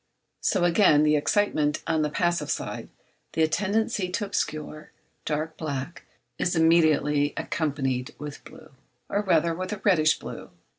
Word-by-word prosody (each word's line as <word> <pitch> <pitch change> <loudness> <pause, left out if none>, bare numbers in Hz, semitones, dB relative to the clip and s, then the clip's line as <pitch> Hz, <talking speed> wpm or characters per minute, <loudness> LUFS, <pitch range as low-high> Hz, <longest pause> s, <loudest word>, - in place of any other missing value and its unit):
So 190 -4 +1
again 170 -4 +5
the 150 0 +4
excitement 150 -2 +1
on 160 -1 +1
the 150 - 0
passive 170 -2 0
side, - - -4 0.4
the 160 -1 +3
tendency 205 +3 0
to 205 +3 -2
obscure, 155 -6 -4 0.4
dark, 155 +1 -3
black, 145 +1 -5 0.3
is 175 - 0
immediately 155 -3 +3
accompanied 135 -4 -2
with 150 -1 -8
blue, 155 - -14 0.4
or 205 - +1
rather 170 -4 +2
with 185 +3 -5
a 210 - -7
reddish 155 -6 +4
blue. - - -9
160 Hz, 140 wpm, -26 LUFS, 150-180 Hz, 0.4 s, again